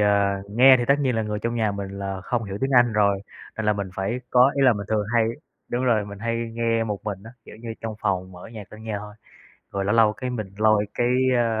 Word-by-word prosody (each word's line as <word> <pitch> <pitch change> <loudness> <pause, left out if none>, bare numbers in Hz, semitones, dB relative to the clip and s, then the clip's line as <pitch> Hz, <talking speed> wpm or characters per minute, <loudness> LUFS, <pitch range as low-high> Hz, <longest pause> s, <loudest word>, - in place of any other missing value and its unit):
à, 100 -1 +2
nghe 130 +5 +7
thì 120 - 0
tất 140 - +6
nhiên 130 -4 +1
là 110 - +1
người 105 -1 -3
trong 115 +2 -3
nhà 110 -3 0
mình 100 -1 -5
là 95 -1 -4
không 115 +4 -2
hiểu 100 -1 -6
tiếng 135 +1 0
Anh 120 -3 +5
rồi, 100 -2 +2 0.3
nên 110 - -3
là 105 - +4
mình 100 -2 -4
phải 100 +7 -2
có 125 +2 +6
ý 140 - +2
là 130 - +6
mình 100 -2 -5
thường 105 -2 0
hay 115 -1 +4 0.4
đúng 125 +2 -1
rồi 110 -4 +2
mình 100 0 -9
hay 115 +1 -2 0.2
nghe 115 -1 0
một 105 -2 -5
mình 100 -2 -4
á, 115 - -10
kiểu - - -12
như, 115 0 -7
trong 110 -1 -5
phòng 95 -3 -1
mở 90 - -11
nhạc 105 -3 -10
lên 110 +1 -11
nghe 110 -2 -3
thôi. 105 0 -10 0.6
Rồi 100 -1 -2
lâu 100 - +1
lâu 110 -2 +5
cái 125 +4 -5
mình 110 -5 -5
lôi 110 -1 +3
cái, 120 - +1 0.3
à, 115 -2 +1
110 Hz, 265 wpm, -24 LUFS, 100-115 Hz, 0.6 s, nghe